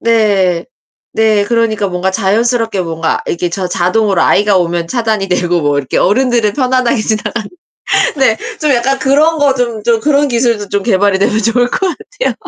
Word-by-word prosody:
네. 200 -7 +1 0.5
네 215 -2 +2
그러니까 220 -2 0
뭔가 180 +1 -2
자연스럽게 225 +1 0
뭔가 165 -1 -2
이렇게 175 +1 -2
저 185 +2 -3
자동으로 185 +2 +1
아이가 205 -1 +3
오면 170 -1 -1
차단이 220 -2 -1
되고 175 -1 0
뭐 145 -1 0
이렇게 135 -2 -3
어른들은 235 -1 +1
편안하게 255 -2 0
지나가는 215 0 -3 0.7
네 250 -5 +3 0.2
좀 300 -2 +2
약간 265 +2 0
그런 300 +5 +2
거 285 -2 +2
좀 235 -4 -2
좀 230 -2 +2
그런 290 +2 +2
기술도 235 -4 0
좀 200 0 -1
개발이 200 -2 +2
되면 210 +2 +1
좋을 235 +3 +1
것 - - -1 0.2
같아요. - - -4
220 Hz, 360 characters per minute, -13 LUFS, 190-245 Hz, 0.7 s, 아이가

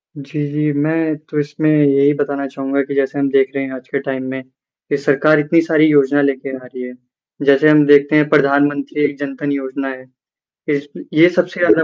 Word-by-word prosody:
जी, 145 +1 -5
जी, 150 0 -1
मैं 155 +2 -1
तो 150 - -2
इसमें 150 +1 -1
यही 145 -1 +3
बताना 140 -1 -2
चाहूँगा 135 +1 -3
कि 140 +1 -6
जैसे 140 0 -1
हम 140 0 0
देख 135 0 +2
रहे 135 - -2
हैं 135 - -6
आज 130 0 -10
के 140 - -3
टाइम 135 -1 -4
में 130 0 -5 0.5
की 145 - 0
सरकार 150 +2 +2
इतनी 160 +3 +2
सारी 160 -2 +2
योजना 145 -1 +3
लेके 135 -1 -2
आ - - -9
रही 125 0 -9
है। 125 0 -8 0.5
जैसे 140 +2 +5
हम 150 -1 +5
देखते 145 +1 +4
हैं 150 -1 +4
प्रधानमंत्री 145 0 +1
एक 145 -1 -3
जन 140 -1 -5
धन 145 -1 -2
योजना 135 0 -4
है। 130 -1 -9 0.6
देश 145 0 -1
में - - -9
ये 170 +3 +6
सबसे 180 +1 -2
ज़्यादा 170 -2 +4
145 Hz, 215 wpm, -17 LUFS, 135-150 Hz, 0.6 s, ये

